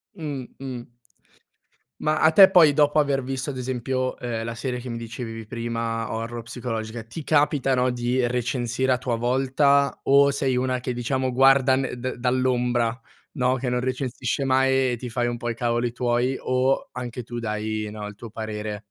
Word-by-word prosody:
Mh, 145 -7 -5
mh. 125 -3 -7 1.1
Ma 155 0 +1
a 155 - +6
te 190 +3 +9
poi 165 -6 +6
dopo 150 0 +4
aver 140 -3 0
visto, 135 +2 -3
ad 130 - -6
esempio, 130 +1 -2
ehm, 115 -2 -3
la 115 0 -4
serie 125 +1 -3
che 125 +1 -7
mi 115 -1 -4
dicevi 115 -1 -7
prima 115 -1 -3
horror 115 +1 -4
psicologica, 115 -1 -5
ti 130 +7 -8
capitano 135 -4 +2
di 125 +1 0
recensire 125 +1 0
a 125 - +1
tua 125 -2 -2
volta 135 +3 +2
o 140 +1 +5
sei 135 -2 0
una 130 0 0
che 125 0 -3
diciamo, 130 +1 -1
guarda 135 0 +5
ne 130 -2 -2
da 130 +1 -4
dall'ombra, 125 -1 +1 0.3
no, 130 -2 +1
che 125 0 -3
non 125 0 0
recensisce 130 +1 -2
mai 130 -1 +3
e - - -2
ti 125 +1 -7
fai 120 +1 0
un 120 0 -2
po' 120 - -4
i 115 - -4
cavoli 120 0 0
tuoi, 125 +2 0
o 130 +1 0
anche 125 -1 -6
tu 120 0 -6
dai, 110 -1 -3
no, 105 -1 -6
il 105 - -8
tuo 115 +1 -10
parere? 105 -1 -5
125 Hz, 180 wpm, -24 LUFS, 120-130 Hz, 1.1 s, te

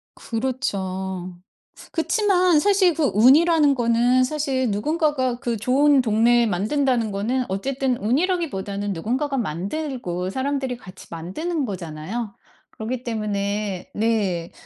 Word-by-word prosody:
그렇죠. 190 -7 -3 0.6
그치만 360 -2 +3
사실 385 -1 +3
그 315 - -1
운이라는 295 +6 +5
거는 240 +1 +3
사실, 265 -3 -1
누군가가 260 - 0
그 240 -4 -2
좋은 270 +5 +4
동네 235 +1 +3
만든다는 230 +3 0
거는 240 +6 -1
어쨌든 255 +5 -1
운이라기보다는 215 - -1
누군가가 260 - -2
만들고 195 - -3
사람들이 265 +2 -2
같이 185 -6 -13
만드는 275 - -3
거잖아요. 190 +3 -5 0.4
그렇기 240 +3 -5
때문에 205 -4 -3
네, 205 -6 0
240 Hz, 280 characters per minute, -23 LUFS, 200-280 Hz, 0.6 s, 운이라는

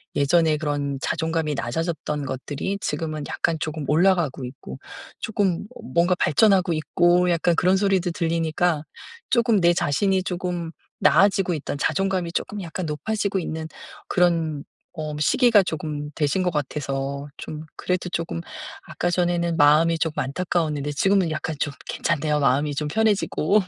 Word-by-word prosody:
예전에 155 +2 +3
그런 145 -3 -2
자존감이 160 -2 -1
낮아졌던 150 +2 -3
것들이 145 +9 -4
지금은 155 -3 -3
약간 165 -1 0
쪼금 155 -2 -4
올라가고 165 -5 +2
있고 125 - -9 0.4
쪼끔 200 -4 -1
어 - - -10
뭔가 175 +2 +3
발전하고 190 0 +4
있고 175 +3 +2
약간 170 0 +2
그런 185 +3 +3
소리도 190 -3 +1
들리니까 165 -1 0 0.5
쪼금 235 -5 +3
내 170 0 +5
자신이 185 +5 +1
쪼금 175 -2 -3 0.3
나아지고 195 -2 +4
있던 145 -1 -4
자존감이 190 +1 0
쪼끔 210 -1 -3
약간 170 +1 -5
높아지고 200 +6 -1
있는 160 -2 -4 0.4
그런 165 -5 +1 0.3
어 155 -3 -5
시기가 220 - +4
쪼금 150 -3 -4
되신 160 +5 +1
것 180 - +1
같아서 140 -1 -3
좀 155 +1 -7
그래도 180 -1 -2
쪼금 165 - -3 0.5
아까 175 - -2
전에는 175 -1 0
마음이 155 +3 +5
조금 160 -2 -1
안타까웠는데 150 -1 -1
지금은 190 +1 +2
약간 155 0 -3
좀 145 - -1 0.2
괜찮네요. 150 -2 0
마음이 145 +2 +2
좀 150 +1 -2
편해지고. 210 -2 +2
165 Hz, 335 characters per minute, -23 LUFS, 150-180 Hz, 0.5 s, 내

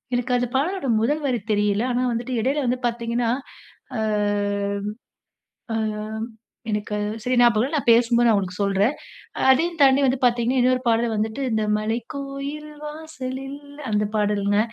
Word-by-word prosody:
எனக்கு 245 +1 0
அந்த 245 - 0
பாடலோட 340 +2 -1
முதல் 295 +7 +1
வரி 250 -3 0
தெரியல. 205 +1 +1
ஆனா 245 +1 0
வந்துட்டு 240 +2 -3
இடையில 275 +5 0
வந்து 250 +1 0
பாத்தீங்கன்னா, 235 0 -1 0.7
ஆ, - - -1 1.8
ஆம் 220 0 -3 0.5
எனக்கு 210 0 -2 0.3
சரி 255 +2 +1
ஞாபகம் 235 -3 +5
இல்ல. 275 +5 -3
நான் 270 - 0
பேசும்போது 235 +1 +4
நான் 225 - +5
உங்களுக்கு 185 0 -3
சொல்றேன். 200 +6 +2 0.6
அதையும் 330 +5 +2
தாண்டி 270 0 +6
வந்து 255 0 +1
பாத்தீங்கன்னா, 245 +1 +2
இன்னொரு 255 0 +2
பாடல் 230 0 +2
வந்துட்டு, 220 +5 -2
"இந்த 220 -1 +1
மலைக்கோயில் 275 +7 -4 0.2
வாசலில்" 280 -3 -6 0.3
அந்த 210 0 +2
பாடல்ங்க. 205 -1 +1
240 Hz, 140 wpm, -23 LUFS, 220-270 Hz, 1.8 s, தாண்டி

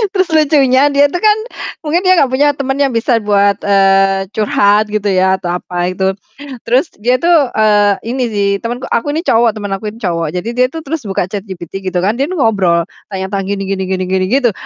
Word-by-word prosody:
Terus 370 -1 +2
lucunya 285 -3 +3
dia 285 +1 +4
tuh 355 - -4
kan 425 0 +4 0.5
mungkin 330 +4 0
dia 370 -2 +4
nggak 265 - +2
punya 290 +3 +3
teman 270 -1 -2
yang 275 -2 +2
bisa 230 0 +1
buat, 200 -1 +2
eee, 195 -1 +3
curhat 210 0 +2
gitu 210 -1 -2
ya 190 0 +2
atau 175 -1 -3
apa 175 0 -3
itu, 190 +1 0 0.6
terus 255 +8 +1
dia 245 +4 +2
itu, 345 - +1 0.2
eee, 210 -2 +3 0.2
ini 260 0 -1
sih 200 -1 0
temanku 240 +2 -4
aku 290 +5 0
ini 325 - -2
cowok 230 - +2
teman 205 -2 -6
aku 210 +1 -5
ini 230 - -14
cowok. 165 -4 -1
Jadi, 180 +6 -3
dia 250 0 +3
itu 325 - -6
terus 305 0 -4
buka 195 - -1
ChatGPT 195 -3 -6
gitu 180 -1 -1
kan, 205 +4 +1
dia 280 - +1
nih 370 - -4
ngobrol 190 -8 +2 0.3
tanya-tanya 195 +1 -3
gini 195 - -4
gini 190 -1 -2 0.2
gini, 185 0 0
gitu. 255 -3 +2
215 Hz, 205 wpm, -14 LUFS, 195-270 Hz, 0.6 s, dia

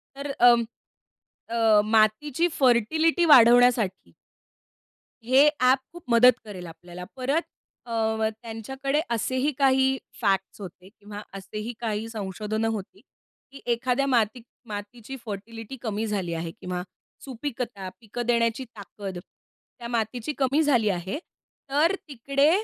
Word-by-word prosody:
तर 280 +1 -5
अं, 240 -1 +6 0.9
अ, 225 -2 +4
मातीची 225 - +2
फर्टिलिटी 315 +7 +3
वाढवण्यासाठी. 240 - +5 1.1
हे 265 +4 +6
ॲप 255 +1 +5
खूप 345 -1 -11
मदत 245 +2 +7
करेल 190 -4 -8
आपल्याला. 175 +2 -10
परत 275 +5 0 0.4
अ, 235 - -9 0.3
व 220 - +1 0.2
त्यांच्याकडे 265 +5 -3
असेही 255 +5 0
काही 265 -1 +3 0.2
फॅक्ट्स 195 0 0
होते 185 0 -10
किंवा 205 0 -10
असेही 210 +4 -6
काही 220 -1 -2
संशोधनं 215 +1 -3
होती, 200 -2 -7 0.5
की 275 - -12
एखाद्या 250 +3 0
माती 235 -2 +1 0.3
मातीची 215 +4 -7
फर्टिलिटी 225 +4 -7
कमी 220 -2 -2
झाली 190 -5 -2
आहे 165 0 -4
किंवा 180 +1 -5 0.4
सुपीकता 245 -7 -5
पिकं 235 +2 -6
देण्याची 235 +1 +1
ताकद 200 -4 -9
त्या 235 +6 -15
मातीची 235 +3 -2
कमी 275 +3 +2
झाली 245 -8 +3
आहे. 185 +4 -2 0.5
तर 310 +7 +3
तिकडे 275 +2 +1
230 Hz, 120 wpm, -25 LUFS, 210-265 Hz, 1.1 s, मदत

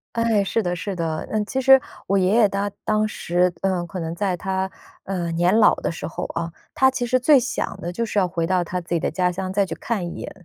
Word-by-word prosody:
哎， 230 -3 +2
是 225 +3 0
的， 175 -1 -2
是 195 +3 -4
的。 165 -3 -3
呃， 215 -1 +1
其 265 - -3
实 265 0 +7 0.3
我 195 0 +2
爷 185 +2 +2
爷 230 -2 +6
他 200 +1 -2
当 215 0 +1
时， 180 -2 +1
嗯， 185 -3 0
可 180 +2 -7
能 165 0 -3
在 185 0 -1
他， 190 +1 -2 0.3
呃， 175 -3 -2
年 175 +5 +3
老 210 - +6
的 - - -2
时 165 - -5
候 - - -4
哦， 170 0 -3 0.2
他 265 0 +5
其 250 -2 -2
实 255 +2 +2
最 275 +2 +5
想 - - -3
的 170 - -4
就 230 +7 -2
是 210 -2 -2
要 185 -2 +3
回 170 -2 -1
到 180 0 +2
他 180 +1 -3
自 170 - -10
己 170 - +1
的 - - -1
家 180 +2 +1
乡 185 +1 -4
再 200 +1 +2
去 190 - -5
看 215 -7 -2
一 - - -5
眼。 - - -6
190 Hz, 275 characters per minute, -22 LUFS, 175-215 Hz, 0.3 s, 实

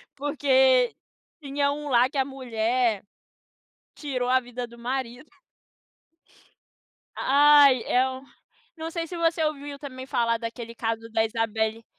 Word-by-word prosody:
Porque 265 -3 +3 0.5
tinha 280 0 0
um 295 0 -5
lá 250 0 +4
que 285 - -6
a 265 - +2
mulher 240 -4 -1 0.9
tirou 255 -5 -3
a 260 +1 +4
vida 245 0 -6
do 235 0 -16
marido. 250 +2 -4 1.9
Ai, 285 -2 +6
e 255 +1 +3
o 260 0 -7 0.5
não 325 0 -6
sei 330 0 -4
se 350 - -8
você 330 -1 +1
ouviu 290 -2 -3
também 260 -2 -8
falar 230 -3 0
daquele 230 0 -7
caso 225 -1 -3
da 220 0 +2
Isabelly 225 0 -2
260 Hz, 130 wpm, -25 LUFS, 235-285 Hz, 1.9 s, Ai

